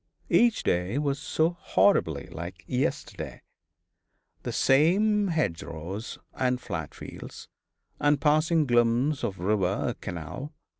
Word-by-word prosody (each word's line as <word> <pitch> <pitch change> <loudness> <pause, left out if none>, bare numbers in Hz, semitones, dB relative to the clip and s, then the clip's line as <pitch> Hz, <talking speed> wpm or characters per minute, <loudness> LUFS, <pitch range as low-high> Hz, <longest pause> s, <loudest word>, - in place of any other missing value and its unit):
Each 235 -2 +4
day 90 +7 0
was 140 -1 0
so 160 +3 +1
horribly 80 - +2
like 85 +3 -7
yesterday. 125 +1 -3 1.0
The - - -4
same 200 +9 +3
hedgerows 95 - -3 0.2
and 125 -1 0
flat 80 - -5
fields, - - -10 0.5
and 145 -1 +3
passing 155 +2 +3
glimpse 120 +3 +2
of 100 -5 -2
river 95 +3 0
or - - -2
canal. 90 - -7
125 Hz, 110 wpm, -27 LUFS, 95-155 Hz, 1.0 s, Each